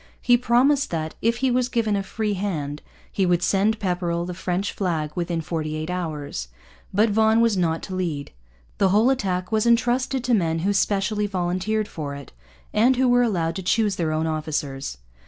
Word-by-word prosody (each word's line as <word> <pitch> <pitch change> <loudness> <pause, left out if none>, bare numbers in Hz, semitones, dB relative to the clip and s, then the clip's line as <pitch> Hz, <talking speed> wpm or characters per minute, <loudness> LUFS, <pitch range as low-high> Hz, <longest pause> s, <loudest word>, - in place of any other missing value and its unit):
He 245 - +4
promised 255 +4 +3
that, 160 -2 -3
if 230 +1 +1
he 260 - +3
was 250 0 +1
given 225 -4 +1
a 200 - 0
free 210 +2 -2
hand, 155 -7 -3 0.3
he 195 - 0
would 175 -1 +2
send 205 +4 +2
Pepperrell 175 -3 -1
the 180 - -5
French 185 +2 -2
flag 160 -6 -2
within 170 -1 -2
forty 155 -2 -3
eight 155 +3 -4
hours. 150 - -4 0.4
But 210 +3 +3
Vaughan 220 +1 +4
was 230 -2 +3
not 165 -3 0
to 190 - -6
lead. 165 -6 -3 0.5
The 195 - +4
whole 215 +7 +4
attack 185 -7 -1
was 220 +1 +2
entrusted 245 +2 +2
to 250 -1 +1
men 165 -6 +2
who 205 - +2
specially 205 +1 +1
volunteered 190 +3 -1
for 145 -3 -5
it, 140 -1 -10 0.4
and 245 +5 +4
who 255 +1 +2
were 245 0 +4
allowed 175 -8 0
to - - -3
choose 205 +1 +1
their 160 -3 0
own 155 +1 0
officers. 150 - -3
190 Hz, 190 wpm, -23 LUFS, 165-220 Hz, 0.5 s, He